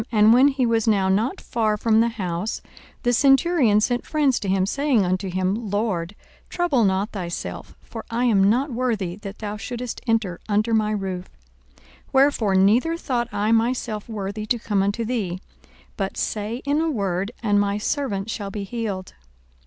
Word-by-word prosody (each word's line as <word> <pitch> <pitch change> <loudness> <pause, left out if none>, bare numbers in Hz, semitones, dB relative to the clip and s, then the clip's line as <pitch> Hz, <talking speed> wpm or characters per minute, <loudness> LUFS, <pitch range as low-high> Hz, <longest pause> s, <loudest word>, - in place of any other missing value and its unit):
And 215 0 +6
when 255 +3 +6
he 270 -3 +1
was 230 -1 +1
now 195 -3 +3
not 220 - +1
far 215 -2 -1
from 220 +1 +3
the 230 - +4
house, 195 -2 -3 0.4
the 245 - +2
centurion 270 -3 +4
sent 245 +3 0
friends 290 -5 +1
to 200 - -5
him, 190 0 +2
saying 265 -1 +1
unto 185 +2 -1
him, 190 +4 -1
Lord, 205 -3 -1 0.3
trouble 345 -9 +1
not 195 +2 +1
thyself: 175 -4 -6
for 225 - -8
I 235 +2 0
am 200 -5 +4
not 260 +6 +1
worthy 225 -8 -1
that 205 -1 -8
thou 210 -1 -5
shouldest 245 +2 -5
enter 220 -6 0
under 215 +2 +1
my 215 -1 +2
roof: 190 -3 -3 0.5
42:007:007 - - -26 0.3
Wherefore 265 -7 +3
neither 230 - +3
thought 245 -7 -2
I 210 +2 0
myself 230 -2 0
worthy 210 0 -4
to 240 - +1
come 210 -3 0
unto 205 +4 -1
thee: 205 -7 -2 0.6
but 195 -2 -3
say 220 +4 -3
in 290 +2 +1
a 325 - +1
word, 200 - -1
and 205 -2 +3
my 200 0 +1
servant 210 -4 -2
shall 200 -3 -4
be 200 0 -5
healed. 200 -3 -4
215 Hz, 175 wpm, -23 LUFS, 195-240 Hz, 0.6 s, And